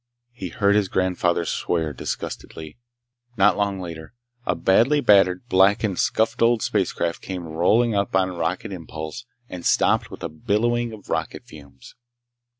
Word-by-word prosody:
He 95 Hz, -7 st, -7 dB
heard 100 Hz, +4 st, +2 dB
his 105 Hz, -2 st, +2 dB
grandfather 90 Hz, -2 st, 0 dB
swear 80 Hz, -2 st, -1 dB
disgustedly. 80 Hz, -, -6 dB, 0.6 s
Not 95 Hz, -1 st, +5 dB
long 100 Hz, -2 st, -1 dB
later, 85 Hz, +3 st, -8 dB, 0.3 s
a -, -, +1 dB
badly 120 Hz, +10 st, +3 dB
battered, 100 Hz, -4 st, +4 dB
blackened, 95 Hz, 0 st, +3 dB
scuffed 115 Hz, +2 st, 0 dB
old 115 Hz, -1 st, +3 dB
spacecraft 85 Hz, 0 st, -1 dB
came 90 Hz, -2 st, -6 dB
rolling 90 Hz, +9 st, +2 dB
up 100 Hz, -1 st, -1 dB
on 95 Hz, -1 st, +1 dB
rocket 90 Hz, +6 st, -3 dB
impulse 80 Hz, +5 st, -7 dB, 0.2 s
and 90 Hz, -5 st, -8 dB
stopped -, -, +2 dB
with -, -, -10 dB
a -, -, -1 dB
billowing 115 Hz, +9 st, 0 dB
of 110 Hz, -3 st, -11 dB
rocket -, -, -3 dB
fumes. 70 Hz, -3 st, -15 dB
95 Hz, 145 wpm, -23 LUFS, 85-110 Hz, 0.6 s, Not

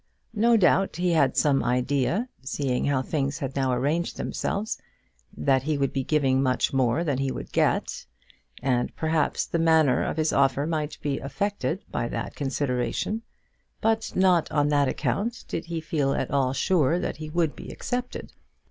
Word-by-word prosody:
No 230 Hz, +2 st, +4 dB
doubt 195 Hz, 0 st, +3 dB
he 180 Hz, 0 st, +1 dB
had 140 Hz, -6 st, +2 dB
some 140 Hz, -2 st, +3 dB
idea, 135 Hz, -, +1 dB
seeing 135 Hz, -1 st, -1 dB
how 140 Hz, -2 st, +1 dB
things 140 Hz, -1 st, -1 dB
had 135 Hz, -1 st, -4 dB
now 135 Hz, -2 st, +1 dB
arranged 145 Hz, +8 st, 0 dB
themselves, 210 Hz, +2 st, -2 dB, 0.6 s
that 130 Hz, -, +2 dB
he 150 Hz, +2 st, -1 dB
would 140 Hz, -1 st, 0 dB
be 135 Hz, -, -1 dB
giving 135 Hz, -3 st, +2 dB
much 130 Hz, 0 st, +1 dB
more 130 Hz, +4 st, +2 dB
than 145 Hz, -6 st, -1 dB
he 135 Hz, -1 st, 0 dB
would -, -, -7 dB
get; -, -, 0 dB, 0.6 s
and 125 Hz, -3 st, 0 dB
perhaps 160 Hz, -1 st, 0 dB
the 170 Hz, -, -2 dB
manner 160 Hz, -5 st, +4 dB
of -, -, -3 dB
his 155 Hz, 0 st, +1 dB
offer 140 Hz, +1 st, +2 dB
might 155 Hz, -2 st, -2 dB
be 140 Hz, -2 st, -1 dB
affected 190 Hz, +6 st, -2 dB
by 120 Hz, -, -1 dB
that 115 Hz, -1 st, -5 dB
consideration; 135 Hz, -, -1 dB, 0.6 s
but 225 Hz, 0 st, 0 dB
not 185 Hz, -3 st, +3 dB
on 145 Hz, -1 st, +2 dB
that 145 Hz, -1 st, +3 dB
account 225 Hz, -, -2 dB
did 165 Hz, -, -4 dB
he 165 Hz, -1 st, -3 dB
feel 150 Hz, -3 st, 0 dB
at -, -, -2 dB
all 135 Hz, -2 st, +2 dB
sure 160 Hz, +2 st, +2 dB
that 180 Hz, -, -3 dB
he 155 Hz, 0 st, -6 dB
would 165 Hz, -1 st, 0 dB
be -, -, -9 dB
accepted. 250 Hz, 0 st, -4 dB
145 Hz, 170 wpm, -26 LUFS, 135-170 Hz, 0.6 s, No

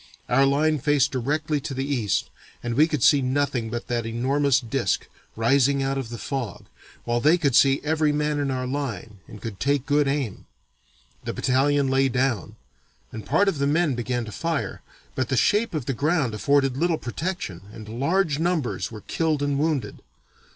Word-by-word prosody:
Our 135 Hz, +3 st, +4 dB
line 150 Hz, +2 st, +2 dB
faced 145 Hz, +1 st, +2 dB
directly 145 Hz, +4 st, -1 dB
to 135 Hz, -, -5 dB
the 135 Hz, +1 st, -2 dB
east 125 Hz, -9 st, -1 dB, 0.3 s
and 120 Hz, 0 st, -2 dB
we 150 Hz, +6 st, +4 dB
could 150 Hz, -7 st, -2 dB
see 145 Hz, -, +6 dB
nothing 130 Hz, -3 st, 0 dB
but 120 Hz, +1 st, -4 dB
that 120 Hz, -2 st, -1 dB
enormous 135 Hz, +4 st, +2 dB
disk, 120 Hz, -4 st, -1 dB, 0.3 s
rising 135 Hz, +4 st, +3 dB
out 135 Hz, 0 st, -1 dB
of 125 Hz, -4 st, -5 dB
the 120 Hz, -, -6 dB
fog, 125 Hz, -6 st, -5 dB, 0.4 s
while 120 Hz, 0 st, 0 dB
they 155 Hz, +7 st, +4 dB
could 140 Hz, -7 st, +1 dB
see 135 Hz, 0 st, +5 dB
every 155 Hz, 0 st, +1 dB
man 150 Hz, 0 st, 0 dB
in 140 Hz, -1 st, -1 dB
our 130 Hz, -1 st, -2 dB
line 120 Hz, -7 st, -4 dB
and 105 Hz, -, -11 dB
could 105 Hz, -4 st, -7 dB
take 140 Hz, +1 st, +1 dB
good 145 Hz, 0 st, +2 dB
aim. 135 Hz, -7 st, -2 dB, 0.8 s
The -, -, -4 dB
battalion 140 Hz, +2 st, +2 dB
lay 135 Hz, 0 st, +2 dB
down, 125 Hz, -6 st, -1 dB, 0.6 s
and 110 Hz, -, -7 dB
part 180 Hz, +9 st, +3 dB
of 165 Hz, -7 st, 0 dB
the 140 Hz, -, +1 dB
men 155 Hz, 0 st, +2 dB
began 120 Hz, 0 st, -2 dB
to 110 Hz, -, -8 dB
fire, 165 Hz, +4 st, -3 dB, 0.3 s
but 130 Hz, -2 st, -2 dB
the 130 Hz, -, +1 dB
shape 210 Hz, -, +2 dB
of 145 Hz, -6 st, -2 dB
the 135 Hz, -, -1 dB
ground 145 Hz, -2 st, 0 dB
afforded 135 Hz, +2 st, +2 dB
little 165 Hz, +1 st, +1 dB
protection 155 Hz, -, -4 dB
and 110 Hz, -1 st, -10 dB
large 165 Hz, 0 st, +1 dB
numbers 165 Hz, -9 st, -1 dB
were 110 Hz, -2 st, -8 dB
killed 155 Hz, +1 st, -1 dB
and 140 Hz, -1 st, 0 dB
wounded. 155 Hz, -3 st, -1 dB
135 Hz, 185 wpm, -24 LUFS, 120-150 Hz, 0.8 s, see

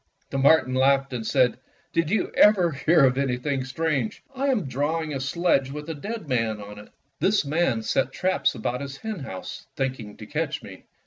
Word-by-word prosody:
^^" -, -, -44 dB
The 135 Hz, -, -1 dB
marten 140 Hz, -1 st, +4 dB
laughed 135 Hz, +1 st, +3 dB
and 115 Hz, -3 st, -3 dB
said: 125 Hz, -2 st, +2 dB, 0.3 s
"Did 165 Hz, -2 st, +1 dB
you 215 Hz, -, 0 dB
ever 190 Hz, -5 st, +5 dB
hear 155 Hz, +1 st, +4 dB
of 130 Hz, 0 st, +2 dB
anything 135 Hz, +1 st, -1 dB
so 130 Hz, -, -6 dB
strange 135 Hz, -4 st, -2 dB
I 270 Hz, +2 st, -1 dB
am 250 Hz, -, +1 dB
draw 145 Hz, +5 st, -1 dB
ing 155 Hz, -1 st, -5 dB
a 135 Hz, -, -2 dB
sledge 140 Hz, -1 st, +1 dB
with 150 Hz, +2 st, -7 dB
a -, -, -3 dB
dead 205 Hz, +4 st, -6 dB
man 115 Hz, -5 st, 0 dB
on 105 Hz, 0 st, -9 dB
it. 105 Hz, -, -13 dB, 0.3 s
This 200 Hz, -5 st, +2 dB
man 140 Hz, -6 st, +1 dB
set 130 Hz, +4 st, 0 dB
traps 185 Hz, +6 st, +1 dB
about 125 Hz, +3 st, -3 dB
his 135 Hz, -1 st, -6 dB
henhouse, 145 Hz, -, -7 dB
thinking 130 Hz, -6 st, -3 dB
to -, -, -9 dB
catch -, -, -3 dB
me. -, -, -12 dB
135 Hz, 200 wpm, -25 LUFS, 130-165 Hz, 0.3 s, ever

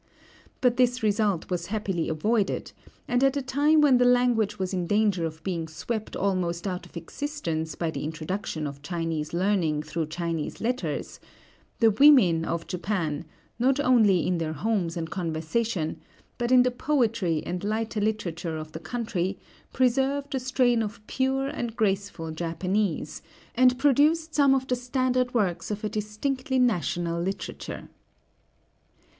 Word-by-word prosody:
But 245 Hz, -2 st, +3 dB
this 250 Hz, -1 st, +2 dB
result 205 Hz, -4 st, +1 dB
was 180 Hz, -, -2 dB
happily 195 Hz, -5 st, -2 dB
avoided; 205 Hz, +7 st, 0 dB, 0.4 s
and 245 Hz, +2 st, +1 dB
at 270 Hz, +1 st, +3 dB
a -, -, 0 dB
time 290 Hz, +4 st, +3 dB
when 270 Hz, -4 st, +5 dB
the -, -, +5 dB
language 245 Hz, -4 st, +3 dB
was 190 Hz, 0 st, -3 dB
in 180 Hz, -2 st, -1 dB
danger 205 Hz, -4 st, +2 dB
of 160 Hz, 0 st, -10 dB
being 170 Hz, -3 st, -2 dB
swept 215 Hz, +8 st, -5 dB
almost 180 Hz, -3 st, -1 dB
out 180 Hz, -2 st, -4 dB
of -, -, -11 dB
existence 165 Hz, -, -4 dB
by 165 Hz, -2 st, -2 dB
the -, -, -5 dB
introduction 160 Hz, +1 st, -4 dB
of 140 Hz, -1 st, -6 dB
Chinese 165 Hz, -1 st, -3 dB
learning 170 Hz, -4 st, +1 dB
through 155 Hz, +1 st, -3 dB
Chinese 165 Hz, -1 st, -3 dB
letters, 250 Hz, +3 st, -3 dB, 0.6 s
the 225 Hz, -1 st, +6 dB
women 210 Hz, -, +6 dB
of 170 Hz, 0 st, -2 dB
Japan, 175 Hz, -4 st, -2 dB, 0.3 s
not 260 Hz, +3 st, +3 dB
only 220 Hz, -, +4 dB
in 180 Hz, -1 st, 0 dB
their 160 Hz, -1 st, -2 dB
homes 180 Hz, -1 st, -1 dB
and 160 Hz, -1 st, -4 dB
conversation, 165 Hz, +1 st, -2 dB, 0.4 s
but 240 Hz, +1 st, -1 dB
in 250 Hz, -1 st, +7 dB
the 250 Hz, -, +1 dB
poetry 230 Hz, -, 0 dB
and 180 Hz, +1 st, -4 dB
lighter 215 Hz, +1 st, -1 dB
literature 175 Hz, -6 st, -2 dB
of 155 Hz, 0 st, -7 dB
the 160 Hz, -, -7 dB
country, 190 Hz, 0 st, -2 dB, 0.3 s
preserved 270 Hz, +3 st, +1 dB
a 265 Hz, -, 0 dB
strain 250 Hz, -2 st, +2 dB
of 215 Hz, +1 st, -4 dB
pure 265 Hz, +2 st, 0 dB
and 240 Hz, -4 st, -4 dB
graceful 195 Hz, -6 st, -1 dB
Japanese, 175 Hz, +4 st, -2 dB, 0.3 s
and 250 Hz, 0 st, +4 dB
produced 300 Hz, +4 st, +3 dB
some 280 Hz, -2 st, +5 dB
of 265 Hz, -1 st, -1 dB
the 250 Hz, -, +1 dB
standard 250 Hz, 0 st, 0 dB
works 195 Hz, -7 st, 0 dB
of 210 Hz, 0 st, -4 dB
a 215 Hz, -, -1 dB
distinctly 255 Hz, +6 st, -2 dB
national 175 Hz, -, +1 dB
literature. 190 Hz, +3 st, -5 dB
205 Hz, 150 wpm, -26 LUFS, 170-250 Hz, 0.6 s, in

